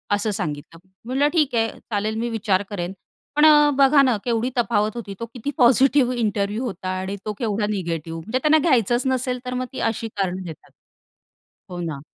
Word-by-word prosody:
असं 205 Hz, +1 st, -1 dB
सांगितलं. 155 Hz, -2 st, -5 dB, 0.3 s
म्हटलं, 270 Hz, +4 st, +1 dB
"ठीक 290 Hz, -7 st, +2 dB
आहे, 225 Hz, 0 st, +2 dB
चालेल, 215 Hz, 0 st, -3 dB
मी 240 Hz, +1 st, -2 dB
विचार 205 Hz, -4 st, 0 dB
करेन." 185 Hz, -2 st, -4 dB, 0.4 s
पण, 300 Hz, +1 st, +5 dB
अ, 295 Hz, -1 st, +7 dB
बघा 275 Hz, +1 st, +6 dB
ना, 255 Hz, -4 st, +3 dB
केवढी 235 Hz, +1 st, 0 dB
तफावत 210 Hz, -1 st, +1 dB
होती. 210 Hz, -4 st, -6 dB
तो 230 Hz, -, -3 dB
किती 250 Hz, +3 st, -4 dB
पॉझिटिव्ह 255 Hz, +1 st, +4 dB
इंटरव्ह्यू 210 Hz, 0 st, -1 dB
होता 190 Hz, -5 st, -5 dB
आणि 190 Hz, +1 st, -4 dB
तो 215 Hz, -, -2 dB
केवढा 215 Hz, -3 st, -1 dB
निगेटिव्ह. 165 Hz, -4 st, -3 dB
म्हणजे 220 Hz, +10 st, -2 dB
त्यांना 305 Hz, +3 st, +4 dB
घ्यायचंच 240 Hz, 0 st, +2 dB
नसेल, 255 Hz, -1 st, -1 dB
तर 250 Hz, -, -4 dB
मग 255 Hz, 0 st, -2 dB
ती -, -, -5 dB
अशी 225 Hz, +1 st, -5 dB
कारणं 190 Hz, -3 st, -3 dB
देतात. 160 Hz, -2 st, -10 dB, 1.0 s
हो 175 Hz, -1 st, -6 dB
ना. 155 Hz, -5 st, -4 dB
225 Hz, 185 wpm, -22 LUFS, 195-255 Hz, 1.0 s, अ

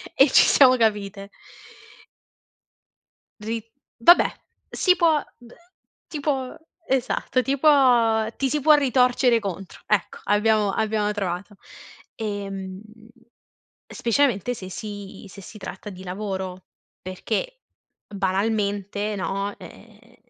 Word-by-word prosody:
e 270 Hz, +1 st, +6 dB
ci -, -, +7 dB
siamo 255 Hz, -2 st, +6 dB
capite. 205 Hz, -3 st, -1 dB, 2.1 s
Ri 225 Hz, +1 st, -4 dB, 0.4 s
vabbè 345 Hz, +10 st, +6 dB, 0.4 s
si 365 Hz, -1 st, +2 dB
può, 320 Hz, -5 st, +2 dB
d 240 Hz, -1 st, -17 dB
uhm, -, -, -16 dB, 0.5 s
ti 305 Hz, -, -6 dB
può 270 Hz, -3 st, -2 dB, 0.3 s
esatto 255 Hz, 0 st, 0 dB
ti 275 Hz, +2 st, -1 dB
può 245 Hz, -7 st, +4 dB
ti 270 Hz, -, -1 dB
si 300 Hz, +3 st, 0 dB
può 305 Hz, +2 st, +6 dB
ritorcere 250 Hz, -3 st, +3 dB
contro, 195 Hz, -3 st, -7 dB
ecco, 210 Hz, -4 st, -1 dB
abbiamo 210 Hz, 0 st, +2 dB
abbiamo 210 Hz, 0 st, 0 dB
trovato. 200 Hz, 0 st, -4 dB, 0.6 s
Ehm, 195 Hz, -3 st, -5 dB, 1.1 s
specialmente 245 Hz, -2 st, 0 dB
se 185 Hz, -4 st, -9 dB
si 205 Hz, +1 st, -8 dB
se 195 Hz, -, -12 dB
si 215 Hz, -, -12 dB
tratta 190 Hz, +2 st, -8 dB
di 185 Hz, 0 st, -11 dB
lavoro, 190 Hz, -1 st, -5 dB, 0.4 s
perché -, -, -4 dB, 0.5 s
banalmente, 205 Hz, +1 st, -1 dB
no, 195 Hz, +1 st, -3 dB
ehm, 235 Hz, +2 st, -16 dB
215 Hz, 110 wpm, -23 LUFS, 195-255 Hz, 2.1 s, ci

